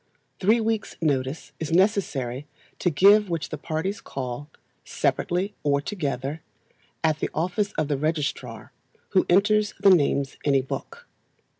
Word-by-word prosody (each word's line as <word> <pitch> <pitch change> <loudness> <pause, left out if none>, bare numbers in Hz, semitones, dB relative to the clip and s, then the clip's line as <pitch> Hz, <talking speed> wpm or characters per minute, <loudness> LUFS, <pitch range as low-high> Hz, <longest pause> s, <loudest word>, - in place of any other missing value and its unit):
Three 215 +5 +4
weeks' 225 -1 -1
notice 140 -2 -1
is 160 -1 -4
necessary, 155 - +1 0.3
to 180 - +2
give 200 +6 +5
which 165 -2 -2
the - - -5
parties 180 +6 -3
call, 130 +2 -6 0.3
separately 185 +4 -1
or 140 -1 +2
together, 145 -4 -3 0.6
at 155 -1 +2
the - - -1
office 185 +5 0
of 155 - -1
the 145 -2 0
registrar, 140 -7 -3 0.4
who 190 - +2
enters 210 +3 +3
the 195 - +6
names 140 -5 +2
in 140 -2 +2
a 135 - +4
book. 460 - -7
160 Hz, 140 wpm, -25 LUFS, 140-200 Hz, 0.6 s, the